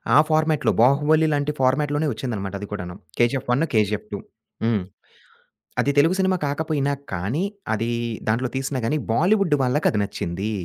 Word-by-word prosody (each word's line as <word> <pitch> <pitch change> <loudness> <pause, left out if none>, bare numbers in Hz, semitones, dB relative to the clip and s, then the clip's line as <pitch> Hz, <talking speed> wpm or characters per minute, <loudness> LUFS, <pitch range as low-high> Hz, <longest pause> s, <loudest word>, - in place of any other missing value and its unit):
ఆ - - +8
ఫార్మాట్‌లో 155 -1 +2
'బాహుబలి' 150 +5 +4
లాంటి 145 0 0
ఫార్మాట్‌లోనే 145 +4 +1
వచ్చిందన్నమాట 105 -5 -4
అది 105 - -5
కూడాను. 90 -4 -5 0.2
'కేజీఎఫ్ 120 +2 +1
1', 160 +5 +1
'కేజీఎఫ్ 105 -1 +1
2' 100 - -4 0.4
హ్మ్. 115 -4 +2 1.0
అది 140 - +3
తెలుగు 165 +5 +4
సినిమా 190 -1 +2
కాకపోయినా 145 -1 0 0.2
కానీ, 100 - -1 0.3
అది 115 +2 -1 0.4
దాంట్లో 120 +3 +1
తీసినా 135 0 -2
గాని, 150 +6 +1 0.2
బాలీవుడ్ 180 - +3
వాళ్ళకది 125 -4 +1
నచ్చింది. 100 +1 -3
135 Hz, 140 wpm, -23 LUFS, 110-155 Hz, 1.0 s, ఆ